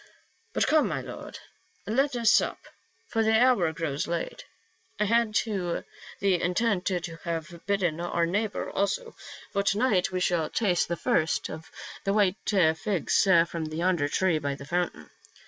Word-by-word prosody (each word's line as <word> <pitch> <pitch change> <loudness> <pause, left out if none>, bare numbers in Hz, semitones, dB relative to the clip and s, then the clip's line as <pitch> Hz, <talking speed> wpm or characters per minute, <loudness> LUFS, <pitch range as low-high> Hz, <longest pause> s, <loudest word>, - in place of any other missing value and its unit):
But - - +2
come, 310 0 +3
my - - -2
lord, - - -8 0.5
let 270 +5 +1
us 230 -2 +4
sup, - - +3 0.5
for 225 - -1
the 220 - +2
houf 220 -9 +4
grows 150 -4 -2
late. 170 0 -4 0.5
I 210 - +2
had 230 0 +2
the 190 -7 -1 0.6
intent 185 +1 +1
to 175 -3 -2
have 170 0 -5
bidden 180 -5 0
oul 170 -1 0
neighbor 205 +4 -1
also, 465 - -1 0.4
for 200 - +2
to 200 0 +1
night 210 -7 +2
we 185 - -1
shall 175 -3 +1
taste 185 -6 +1
the 170 - -2
first 160 -1 0
of 160 +1 -9 0.3
the 195 - 0
white 200 -2 +3
figs 180 -1 +2 0.2
from 165 -1 -4
the 155 0 -6
young 180 +1 +2
tree 170 +1 +1
by 140 -1 -2
the 140 - -10
fountain. 175 - -2
180 Hz, 160 wpm, -27 LUFS, 165-210 Hz, 0.6 s, us